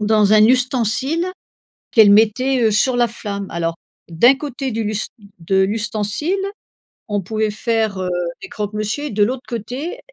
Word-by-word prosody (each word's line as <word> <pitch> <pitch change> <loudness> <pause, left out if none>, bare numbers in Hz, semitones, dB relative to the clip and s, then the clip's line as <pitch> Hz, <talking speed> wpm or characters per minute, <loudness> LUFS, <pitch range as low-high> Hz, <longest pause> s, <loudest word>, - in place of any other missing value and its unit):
Dans 210 -1 +3
un 215 0 +7
ustensile, 255 - +1 0.7
qu'elle 215 -3 +7
mettait, 235 +5 +3
heu, 220 - +3
sur 245 +4 +2
la 240 -1 +3
flamme. 200 -3 -6
Alors 165 0 -2 0.3
d'un 235 +11 +5
côté 275 -2 -5
du 225 0 -2
l'u 215 0 -2 0.4
de 190 +4 0
l'ustensile, 210 - -1 0.7
on 205 -1 -1
pouvait 215 +3 -1
faire, 220 -2 -1
heu, 185 -1 -2 0.3
des - - -9
croque-monsieur 215 +6 -3
et 295 - -3
de 205 0 +2
l'autre 255 +4 -1
côté, 255 - -5
220 Hz, 155 wpm, -19 LUFS, 205-255 Hz, 0.7 s, un